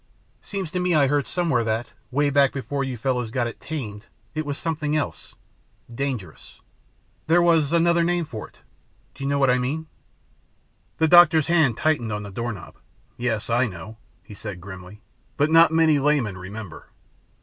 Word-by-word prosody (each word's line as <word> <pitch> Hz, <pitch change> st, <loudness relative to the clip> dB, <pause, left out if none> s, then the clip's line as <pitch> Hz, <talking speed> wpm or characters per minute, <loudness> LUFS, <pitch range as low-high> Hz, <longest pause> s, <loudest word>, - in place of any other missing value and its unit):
Seems 195 Hz, -6 st, -5 dB
to 180 Hz, -, -2 dB
me 180 Hz, -1 st, +1 dB
I 145 Hz, -2 st, +5 dB
heard 145 Hz, +1 st, +1 dB
somewhere 165 Hz, -10 st, 0 dB
that, 110 Hz, +2 st, -2 dB, 0.2 s
way 145 Hz, +2 st, +1 dB
back 140 Hz, -1 st, +4 dB
before 140 Hz, +1 st, -3 dB
you 130 Hz, -2 st, -4 dB
fellows 125 Hz, -1 st, -1 dB
got 120 Hz, +1 st, -1 dB
it 120 Hz, -, -6 dB
'tamed' 115 Hz, -8 st, -6 dB, 0.3 s
it 155 Hz, -1 st, -3 dB
was 140 Hz, -1 st, -3 dB
something 155 Hz, -2 st, -2 dB
else 155 Hz, -, -5 dB, 0.6 s
dangerous. 115 Hz, -, -5 dB, 0.7 s
There 165 Hz, +2 st, +5 dB
was 165 Hz, -4 st, +3 dB
another 170 Hz, 0 st, +3 dB
name 175 Hz, 0 st, 0 dB
for 110 Hz, -8 st, -7 dB
it. -, -, -25 dB, 0.5 s
Do 135 Hz, -, -9 dB
you 140 Hz, -, -1 dB
know 140 Hz, -, +1 dB
what 135 Hz, -2 st, +4 dB
I 125 Hz, -, +2 dB
mean?" 145 Hz, +6 st, -2 dB, 1.1 s
The 160 Hz, -, +3 dB
doctor's 165 Hz, -2 st, +7 dB
hand 160 Hz, -9 st, +2 dB
tightened 145 Hz, -8 st, 0 dB
on 105 Hz, 0 st, -3 dB
the 100 Hz, -, -8 dB
doorknob. 115 Hz, -2 st, -6 dB, 0.4 s
"Yes, 115 Hz, -2 st, -2 dB
I 120 Hz, +2 st, +2 dB
know," 95 Hz, +3 st, -9 dB, 0.3 s
he -, -, -12 dB
said 100 Hz, -3 st, -7 dB
grimly, 95 Hz, +2 st, -11 dB, 0.4 s
"but 150 Hz, +1 st, +2 dB
not 165 Hz, 0 st, +7 dB
many 160 Hz, -2 st, +4 dB
laymen 140 Hz, -8 st, +1 dB
remember. 95 Hz, 0 st, -9 dB
140 Hz, 170 wpm, -23 LUFS, 110-160 Hz, 1.1 s, doctor's